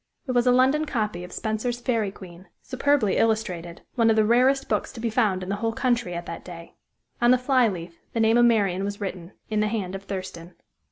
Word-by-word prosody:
It 260 - -2
was 245 0 +2
a - - +6
London 265 +5 +3
copy 215 -10 -2
of 180 - -10
Spenser's 225 +2 -2
Fairy 230 -5 0
Queen, 185 -2 -13 0.2
superbly 265 -5 +1
illustrated, 185 -7 -1
one 230 -3 +3
of 220 - +4
the 215 -1 +3
rarest 260 +4 +3
books - - -1
to 240 - -9
be 230 0 -2
found 210 -5 +1
in 185 - -7
the 200 - -1
whole 225 +1 -1
country 235 -8 0
at 170 0 -5
that 170 - -7
day. 170 -2 -10 0.5
On 240 - +4
the 255 - +6
fly 255 -1 +3
leaf 170 -4 -5 0.2
the 230 - -1
name 225 0 +4
of 240 - +6
Marian 200 -5 +2
was 200 0 -4
written, 185 -2 -6 0.2
in 215 - +1
the 210 - +2
hand 205 -4 -3
of 195 0 -7
Thurston. 185 -3 -7
215 Hz, 225 wpm, -25 LUFS, 185-245 Hz, 0.5 s, a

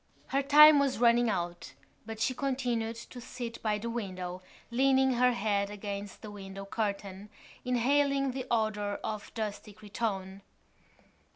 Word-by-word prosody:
Her 275 - +1
time 295 +1 +8
was 280 -2 +1
running 235 0 +4
out 175 -8 -3 0.3
but 225 -1 -6
she 255 - +1
continued 245 -4 -2
to 245 +2 -10
sit 240 -1 -7
by 215 -2 0
the 220 +3 -5
window, 185 -6 -5 0.3
leaning 265 +1 +3
her 250 +1 +3
head 200 -3 0
against 205 0 -6
the 210 - -7
window 195 -1 -8
curtain, 200 -1 -4 0.3
inhaling 275 +2 +2
the 260 0 -5
odour 215 -3 0
of 215 -1 -5
dusty 210 -1 -5
cretonne. 200 -2 -4
225 Hz, 135 wpm, -30 LUFS, 200-250 Hz, 0.3 s, time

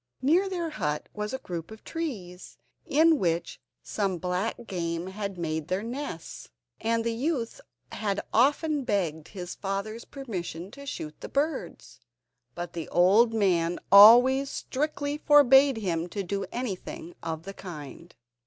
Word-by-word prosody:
Near 345 +9 +3
their 345 -4 -3
hut 150 - -3
was 210 0 -4
a 265 - -2
group 170 -8 -6
of 220 0 -12
birch - - -12
trees, 205 - -6 0.3
in 320 +1 +4
which 170 -5 -1 0.2
some 195 -4 -1
black 180 +5 -1
game 170 -4 -3
had 195 0 -5
made 160 -2 -3
their 185 +3 -1
nests, 240 - -6 0.3
and 230 0 0
the 230 0 -1
youth 250 -1 -2 0.3
had 205 -2 -2
often 290 +4 +2
begged 165 -9 -1
his 180 -3 -7
father's 200 +3 -4
permission 190 - -6
to 280 +3 -11
shoot 155 - -5
the - - -7
birds, 275 - -3 0.6
but 175 -1 -6
the 165 -2 -5
old 200 +7 +5
man 175 -6 +1
always 245 +7 +8
strictly 290 +1 -3
forbade 275 -3 +6
him 175 -5 -2
to 200 +2 -3
do 195 +2 -3
anything 195 -7 -5
of 160 -1 -4
the 195 +2 -7
kind. 170 -3 -10
200 Hz, 145 wpm, -27 LUFS, 175-265 Hz, 0.6 s, always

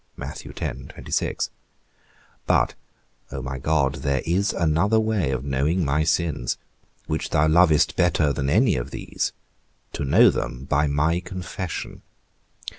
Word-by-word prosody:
But, - - +3 0.6
O 65 - -5
my 65 0 -4
God, 70 -1 +1
there 70 -2 0
is 95 +6 +1
another 85 +7 +2
way 110 -8 0
of 65 -1 -2
knowing 75 +6 +1
my 75 +2 +2
sins, 80 -6 0 0.5
which 75 - -2
thou 75 0 +3
lovest 80 -1 +4
better 80 -4 +2
than 70 0 -1
any 110 - +3
of - - -4
these; - - -3 0.6
to - - -3
know 70 - +6
them 60 +3 -4
by 75 +2 +2
my 75 +4 +1
confession. 90 -1 -6
75 Hz, 120 wpm, -24 LUFS, 70-90 Hz, 0.6 s, know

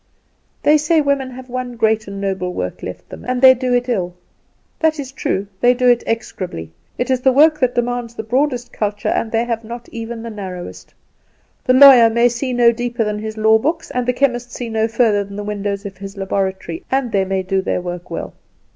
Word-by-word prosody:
"They 300 +1 +5
say 315 +2 +2
women 280 -3 0
have 255 0 -10
one 250 -1 -5
great 220 -2 +1
and 200 0 -6
noble 190 -2 -2
work - - -4
left - - -8
them, - - -10
and 250 0 -2
they 260 0 +9
do 255 0 -2
it 245 0 +1
ill. 180 -7 -2 0.6
That 320 -1 +1
is 270 -2 -5
true; 200 -7 -2
they 245 +2 +4
do 250 0 +1
it 240 -1 +4
execrably. 185 - -4 0.3
It 245 - -1
is 255 -1 +1
the 265 - +4
work 305 +3 +5
that 250 -3 +1
demands 240 -1 -2
the 220 - -5
broadest 245 +1 -1
culture, 205 -1 -2
and 225 - -1
they 230 +1 +1
have 230 -1 -3
not 235 +2 -8
even 230 0 -6
the 230 - -6
narrowest. 185 -4 -8 0.7
The 255 - +4
lawyer 255 -3 +9
may 235 +2 +3
see 240 +2 -3
no 240 -1 +5
deeper 240 0 -2
than 210 -1 -2
his 220 0 -6
law 220 +1 +4
books, 320 +7 -2
and 250 -1 -2
the - - +4
chemist 245 -2 0
see 240 -2 -5
no 220 0 +1
further 225 -3 +2
than 200 0 -11
the 205 - -5
windows 205 -1 -3
of 195 -2 -7
his 195 +1 -9
laboratory, 195 - -3
and 265 -3 0
they 195 -2 +2
may 190 0 -2
do 190 +1 0
their 190 - -1
work 175 0 -6
well. - - -5
235 Hz, 220 wpm, -18 LUFS, 205-255 Hz, 0.7 s, they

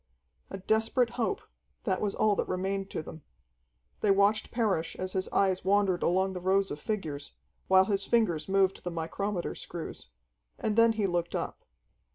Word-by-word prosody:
A 195 - -5
desperate 220 +4 +1
hope 255 - -1 0.4
that 190 -4 0
was 205 -2 -1
all 215 -1 +3
that - - 0
remained 195 +1 -2
to - - -4
them. 160 - -10 0.8
They 210 - +1
watched 200 +2 +3
Parrish 205 -9 0
as 185 0 -4
his 190 -1 -1
eyes 190 -2 +2
wandered 195 -2 +2
along 190 +2 +2
the 180 - -5
rows 195 +2 +2
of 150 - -5
figures, 155 -8 -4 0.3
while 190 0 +6
his 200 -1 -1
fingers 185 -9 +1
moved 195 -1 +2
the 180 - -2
micrometer 175 +3 -3
screws. 165 - -8 0.5
And 210 - -1
then 230 0 +5
he 215 -2 0
looked 175 -2 -1
up. - - -4
195 Hz, 170 wpm, -29 LUFS, 180-210 Hz, 0.8 s, while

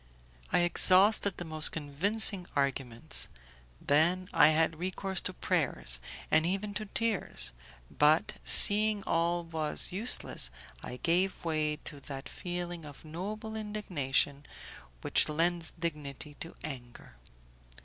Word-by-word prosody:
I - - +3
exhausted 190 +3 +5
the 175 - -6
most 155 -1 +2
convincing 180 +6 0
arguments; 135 -4 -1 0.5
then 175 +6 +1
I - - +6
had 160 0 +1
recourse 190 +1 -2
to - - -3
prayers, 60 +1 0 0.3
and 160 - +3
even 195 +4 -3
to 215 +1 -5
tears; 205 - 0 0.5
but, 150 +2 +3
seeing 210 0 +5
all 170 +1 -1
was 160 -2 -2
useless, 195 - +3 0.3
I 125 - -8
gave 180 +5 -1
way 155 -2 -1
to 145 - -7
that 135 0 -9
feeling 175 -1 -6
of 145 +1 -13
noble 210 +7 -7
indignation 155 -10 -2 0.6
which - - +1
lends 165 +2 -1
dignity 150 -3 -5
to 165 - -7
anger. 120 - -9
165 Hz, 120 wpm, -30 LUFS, 150-190 Hz, 0.6 s, I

